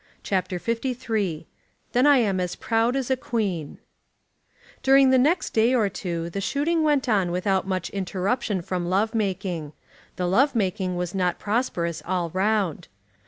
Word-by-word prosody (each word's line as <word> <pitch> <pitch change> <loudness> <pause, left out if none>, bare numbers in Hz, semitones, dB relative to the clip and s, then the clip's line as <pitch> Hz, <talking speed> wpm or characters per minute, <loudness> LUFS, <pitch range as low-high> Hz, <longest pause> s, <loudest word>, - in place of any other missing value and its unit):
CHAPTER 185 -2 -1
LIII 230 - -2 0.5
"Then 250 +4 +3
I 290 -1 +7
Am 200 -6 +1
As 180 -1 -2
Proud 230 +2 +1
As 265 -1 -1
a - - +4
Queen" 200 - -3 1.0
During 270 0 +5
the 260 - +5
next 315 +8 +2
day 230 +3 +3
or 215 -5 +2
two 170 -3 -4
the 195 - -3
shooting 295 - 0
went 295 -4 +2
on 200 -6 +2
without 190 +2 0
much 185 -2 -2
interruption 195 +1 -1
from 175 -1 -3
love 205 +5 +1
making. 185 -7 -2 0.4
The 180 - -2
love 265 +9 +3
making 190 -3 -1
was 175 -1 -3
not 180 -2 0
prosperous 180 -7 -1
all 175 -2 -2
round. 190 -3 0
200 Hz, 155 wpm, -24 LUFS, 180-245 Hz, 1.0 s, I